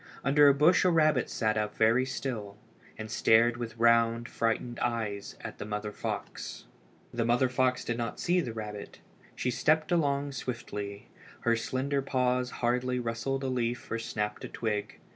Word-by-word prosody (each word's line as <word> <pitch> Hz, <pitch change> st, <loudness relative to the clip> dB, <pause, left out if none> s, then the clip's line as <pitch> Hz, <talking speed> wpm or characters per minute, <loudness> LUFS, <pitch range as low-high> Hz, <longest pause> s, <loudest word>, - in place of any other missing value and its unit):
Under 145 Hz, +2 st, +6 dB
a 140 Hz, -, +7 dB
bush 155 Hz, +6 st, +5 dB
a 185 Hz, -, +4 dB
rabbit 155 Hz, -6 st, +3 dB
sat 110 Hz, -1 st, 0 dB
up 105 Hz, 0 st, -2 dB
very 115 Hz, +4 st, +3 dB
still, 110 Hz, -6 st, -4 dB, 0.4 s
and 110 Hz, 0 st, -7 dB
stared 115 Hz, +1 st, +4 dB
with 115 Hz, -1 st, -6 dB
round, 115 Hz, 0 st, +3 dB
frightened 115 Hz, +1 st, -1 dB
eyes 110 Hz, -4 st, -2 dB
at -, -, -8 dB
the -, -, -3 dB
mother 105 Hz, 0 st, -4 dB
fox. -, -, -5 dB, 0.5 s
The 120 Hz, -1 st, 0 dB
mother 120 Hz, +3 st, +2 dB
fox 130 Hz, 0 st, +1 dB
did 120 Hz, 0 st, -2 dB
not 115 Hz, -2 st, -3 dB
see 180 Hz, +1 st, +2 dB
the 125 Hz, -, -4 dB
rabbit. 105 Hz, -2 st, -7 dB, 0.4 s
She 125 Hz, -, -1 dB
stepped 155 Hz, +6 st, +2 dB
along 145 Hz, -4 st, +1 dB
swiftly. 105 Hz, -6 st, -6 dB, 0.3 s
Her 115 Hz, 0 st, +3 dB
slender 130 Hz, +4 st, -1 dB
paws 125 Hz, -1 st, 0 dB
hardly 125 Hz, +1 st, 0 dB
rustled 125 Hz, +3 st, -2 dB
a -, -, -1 dB
leaf 120 Hz, -2 st, -2 dB
or 115 Hz, -, -1 dB
snapped 105 Hz, -2 st, -3 dB
a -, -, -4 dB
twig. 105 Hz, -2 st, -3 dB
120 Hz, 165 wpm, -29 LUFS, 110-130 Hz, 0.5 s, a